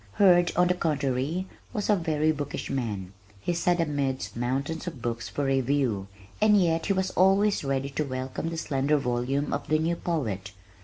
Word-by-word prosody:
Hurd, 175 -3 +5
on 180 +1 +4
the 180 - +3
contrary, 150 0 -1 0.3
was 210 -4 -2
a 210 - +5
very 155 -3 +1
bookish 145 -2 -4
man. 105 -8 -3 0.3
He 175 - -1
sat 175 +1 +1
amidst 140 -4 -1
mountains 135 +8 -2
of 160 -7 -5
"books 115 0 -3
for 145 - -2
review" 135 -6 +1 0.3
and 210 -1 +6
yet 165 -3 +1
he 200 - +3
was 190 -1 0
always 195 +2 +3
ready 135 0 -1
to 150 - -1
welcome 130 +3 -4
the 165 - -5
slender 145 -1 +1
volume 135 +2 -1
of 140 - -3
the 155 +1 +3
new 165 +2 0
poet. 110 - -3
145 Hz, 175 wpm, -27 LUFS, 130-175 Hz, 0.3 s, and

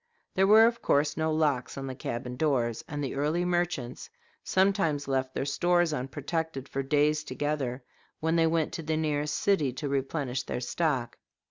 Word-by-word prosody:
There 190 +1 +3
were 220 +2 +8
of 235 0 +1
course 145 +1 +2
no 160 0 0
locks 145 -6 0
on 135 - -4
the 130 - -4
cabin 125 -1 -5
doors, 125 -6 0
and 145 -1 -4
the 135 - -3
early 150 +5 0
merchants 175 -8 -2 0.3
sometimes 190 -7 +1
left 130 -1 -1
their - - -1
stores 175 +3 +2
unprotected 140 +2 -3
for 135 - -2
days 150 +2 +2
together 135 -2 -2 0.4
when 160 +1 +1
they 165 -1 +4
went 160 -1 0
to - - -4
the 160 0 -1
nearest 150 -1 0
city 175 -10 +2
to 145 +3 -4
replenish 135 -1 -1
their - - -4
stock. 130 -2 -1
150 Hz, 170 wpm, -28 LUFS, 135-165 Hz, 0.4 s, were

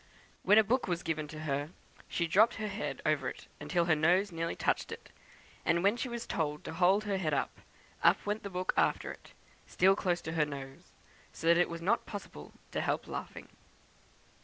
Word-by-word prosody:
When 210 - +5
a 220 - +8
book 245 +5 +1
was 175 -1 -1
given 155 -2 -2
her, 150 -2 -3 0.4
she 170 - -1
dropped 215 +8 +4
her 215 -1 -3
head 205 +2 -4
over 140 -4 +1
it - - -10 0.2
till 175 -2 +2
her 170 - +4
nose 180 +6 +3
nearly 165 0 -2
touched - - 0
it, - - -9 0.5
and 170 +1 +2
when 200 +3 +4
she 245 +1 -3
was 235 -1 -5
told 150 -2 -2
to - - -6
hold 185 +4 +3
her 205 -2 -1
head 155 -5 0
up, - - -2 0.4
up - - +4
went 210 +1 -1
the 200 - -6
book 185 -1 -2
after - - +1
it, - - -14 0.3
still 190 +1 +4
close 175 -3 0
to 160 - -5
her 160 -2 +2
nose, 140 +3 -9 0.4
so - - -8
that 170 +1 +6
it 175 - +3
was 170 0 -6
not 220 +6 +1
possible 195 - -8 0.2
to - - -1
help - - -1
laughing." - - -6
175 Hz, 200 wpm, -32 LUFS, 155-200 Hz, 0.5 s, a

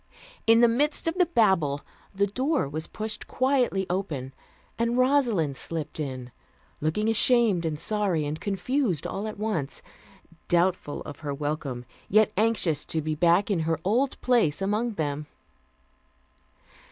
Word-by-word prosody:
In 225 +1 +6
the 240 - +7
midst 290 +8 +1
of 330 - +2
the 360 - +5
Babel 190 - +2 0.3
the 200 0 +1
door 260 - 0
was 155 +3 -4
pushed 215 0 -6
quietly 255 -7 +1
open, 155 -8 -3 0.5
and 235 +1 +1
Rosalind 245 - +2
slipped 160 -2 -4
in, 130 -4 -5 0.5
looking 160 +8 0
ashamed 225 -5 +3
and 150 -2 -3
sorry 190 -4 0
and 150 +2 -4
confused 205 - -1
all 205 +2 -3
at 215 - -6
once; 200 -10 -2 0.6
doubtful 175 -3 +1
of 145 - -9
her 145 -2 -4
welcome, 145 -4 -3 0.2
yet 215 +1 +4
anxious 195 -8 +1
to 160 - -2
be 155 0 -2
back 175 +6 +3
in 190 - +1
her 160 0 0
old 245 +7 +1
place 235 -12 +2
among 210 +4 0
them. 150 -4 -3
195 Hz, 140 wpm, -26 LUFS, 155-230 Hz, 0.6 s, the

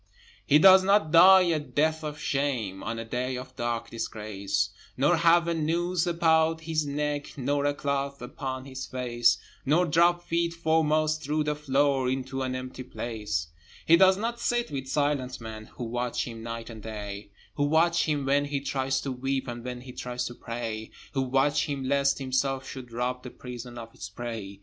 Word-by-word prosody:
He 145 - +6
does 190 +3 +8
not 195 -5 +3
die 185 +3 +9
a 170 -3 +1
death 155 +2 0
of 150 0 -5
shame 130 -10 -1
On 115 0 -4
a 115 - -5
day 125 +2 -2
of 130 0 -9
dark 120 -1 -3
disgrace, 100 -3 -2 0.3
Nor 145 +6 +3
have 170 0 +4
a 170 - +1
noose 170 +2 0
about 165 -1 +3
his 160 -2 -1
neck, 145 0 -3
Nor 140 +2 0
a 145 0 +1
cloth 140 -1 -2
upon 130 +1 -5
his 130 -1 -6
face, 120 -2 +2 0.3
Nor 160 +6 +3
drop 175 +2 +3
feet 170 0 -1
foremost 155 -1 +2
through 150 +1 0
the 150 0 0
floor 140 -2 +1
Into 130 0 -3
an 130 -1 -2
empty 130 0 -6
place 105 -11 -4 0.4
He 165 - +7
does 190 +2 +6
not 235 +3 -3
sit 240 -4 0
with 135 -2 -4
silent 140 -2 0
men 110 -1 -8
Who - - -5
watch 120 +1 -2
him 115 -2 -7
night 115 0 -6
and 110 -1 -10
day; 105 -1 -7 0.2
Who 145 - 0
watch 165 +3 +3
him 145 -3 -1
when 140 +1 +2
he 145 -1 -2
tries 135 -1 -1
to 135 - -3
weep, 135 +1 -2
And 120 -1 -6
when 125 0 -5
he 130 0 -10
tries 125 0 -4
to 120 - -5
pray; 115 -2 -5 0.2
Who 135 - +1
watch 135 +4 +2
him 140 -2 -3
lest 140 0 +2
himself 135 0 -1
should 130 -4 -8
rob 125 +2 -2
The 125 - -8
prison 125 -1 -9
of 115 -1 -9
its 100 - -8
prey. 100 -3 -6
135 Hz, 190 wpm, -27 LUFS, 120-155 Hz, 0.4 s, die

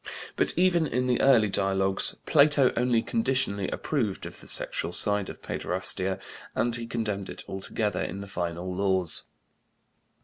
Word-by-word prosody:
But - - +1
even 175 -3 +3
in 125 -2 -1
the 125 -1 +1
early 125 -6 +5
dialogues 95 -1 +1
Plato 145 -3 +5
only 120 -1 +2
conditionally 130 - 0
approved 115 -11 -2
of - - -10
the - - -13
sexual - - -1
side 105 +2 0
of - - -10
paiderastia 95 +1 +2 0.4
and 120 -1 0
he 115 -1 -6
condemned 105 -4 -3
it - - -8
altogether 105 +2 -2
in 100 - -4
the 100 - -7
final 90 -1 -4
Laws. 95 -3 0
105 Hz, 145 wpm, -27 LUFS, 95-125 Hz, 0.4 s, early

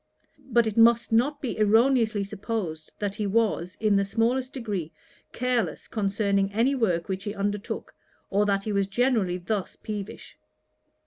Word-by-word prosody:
But 235 -1 +4
it 220 0 -3
must 230 0 +5
not 280 +6 +2
be 245 - -3
erroneously 220 0 +3
supposed 195 -6 -4
that 205 -2 -2
he 210 0 -2
was, 200 -4 0
in 215 -2 +3
the 200 - +3
smallest 240 +6 0
degree, 205 - -4 0.4
careless 250 -2 -1
concerning 200 -2 0
any 235 +6 +2
work 185 -10 0
which 190 +1 -4
he 205 0 -4
undertook, 205 0 -3 0.4
or 205 +1 +2
that 195 -1 +1
he 215 - -3
was 200 -1 +1
generally 210 -4 +1
thus 185 +2 -3
peevish. 210 -2 -7
210 Hz, 150 wpm, -26 LUFS, 195-230 Hz, 0.4 s, must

